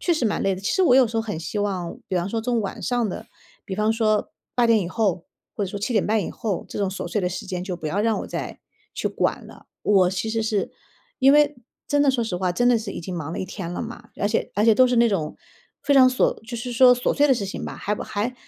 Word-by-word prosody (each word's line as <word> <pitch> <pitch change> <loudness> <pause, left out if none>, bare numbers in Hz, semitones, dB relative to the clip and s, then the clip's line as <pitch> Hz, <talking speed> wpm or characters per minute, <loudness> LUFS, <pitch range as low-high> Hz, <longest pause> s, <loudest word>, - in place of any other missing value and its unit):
确 350 - +1
实 310 -7 0
蛮 210 - 0
累 195 - +2
的， 185 - -8
其 200 - -6
实 380 - +2
我 250 -8 +5
有 260 -2 +6
时 225 +1 -5
候 225 - +1
很 210 -7 -4
希 170 +6 -4
望 185 -4 -2
比 185 - -1
方 175 +2 -1
说 225 +2 -2
从 235 0 0
晚 195 - -5
上 245 -4 0
的， - - -6 0.4
比 190 - -5
方 215 +2 +1
说 215 -2 +1 0.2
8 240 -1 +3
点 225 -2 +4
以 175 - -3
后， 190 -4 0 0.3
或 205 - -1
者 190 - -5
说 205 - -4
7 235 +5 -2
点 210 - +2
半 215 -1 +1
以 - - -4
后， 205 -5 -3
这 - - -8
种 195 -2 0
琐 195 - -5
碎 210 - -1
的 180 - 0
时 180 +1 -6
间 180 -2 -4
就 185 -2 -4
不 160 -2 -6
要 190 +7 -1
让 220 0 +1
我 - - -5
再 - - -5 0.4
去 - - -2
管 - - -1
了。 - - -15 0.2
我 190 -3 +4
其 190 +4 -3
实 225 0 -1
是 215 -2 -1 0.5
因 270 +2 +6
为 295 0 +4 0.3
真 290 -1 +2
的 280 - +4
说 240 -3 0
实 185 -5 -3
话， 185 0 0
真 245 +8 +2
的 245 - +5
是 220 -3 -4
已 - - -6
经 180 +2 -6
忙 160 0 -5
了 - - -4
一 - - -2
天 175 -3 -6
了 - - -4
嘛。 235 0 -8
而 - - 0
且 225 - -1
而 205 - +2
且 225 -1 +6
都 255 +2 +5
是 245 - +1
那 235 0 +5
种 160 -7 -2 0.5
非 285 - +3
常 260 -1 +8
锁 255 - +2
就 235 +1 -7
是 245 +1 -5
说 250 +1 +7
琐 245 - 0
碎 290 0 +3
的 - - +6
事 205 -5 -1
情 - - -5
吧， - - -6
还 210 - -2
不 - - -6
还 225 +5 -3
215 Hz, 310 characters per minute, -23 LUFS, 190-240 Hz, 0.5 s, 常